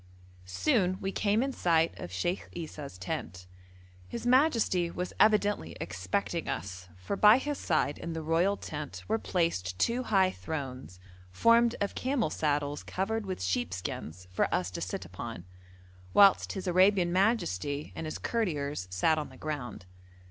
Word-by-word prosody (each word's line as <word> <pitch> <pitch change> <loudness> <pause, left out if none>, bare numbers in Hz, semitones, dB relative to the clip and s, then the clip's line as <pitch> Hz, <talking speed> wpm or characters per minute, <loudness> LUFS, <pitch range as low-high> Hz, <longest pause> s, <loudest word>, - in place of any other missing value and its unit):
Soon 185 - +1
we 195 - -2
came 210 +4 +1
in 270 0 -2
sight 165 -5 +2
of 90 - -7
Sheikh 175 - -2
Esau's 150 - -7
tent; 90 0 -5 0.6
his 235 - -6
majesty 245 - +3
was 180 +1 -4
evidently 205 - +3
expecting 90 +1 -2
us, 95 0 -5
for 90 - -3
by 210 +3 +7
his 290 +1 -3
side 155 -3 0
in 170 - -5
the 160 -1 -4
royal 170 +6 +2
tent 150 -2 -6
were 220 +1 +1
placed 95 - -1
two 235 - +1
high 195 -6 +3
thrones, 130 - -6 0.3
formed 230 - +4
of 200 - -1
camel 260 -3 0
saddles 145 -1 -1
covered 210 +3 -2
with 185 - -4
sheepskins, 90 -3 -3
for 90 - 0
us 90 0 0
to - - -5
sit 90 +1 -4
upon, 90 +1 -7 0.7
whilst 200 -1 +6
his 190 -1 -5
Arabian 185 -1 +4
majesty 175 - 0
and 160 - -4
his 155 - -4
courtiers 150 - -2
sat 155 - +2
on 150 - -5
the 130 - -14
ground. 125 -11 -5
165 Hz, 150 wpm, -30 LUFS, -, 0.7 s, by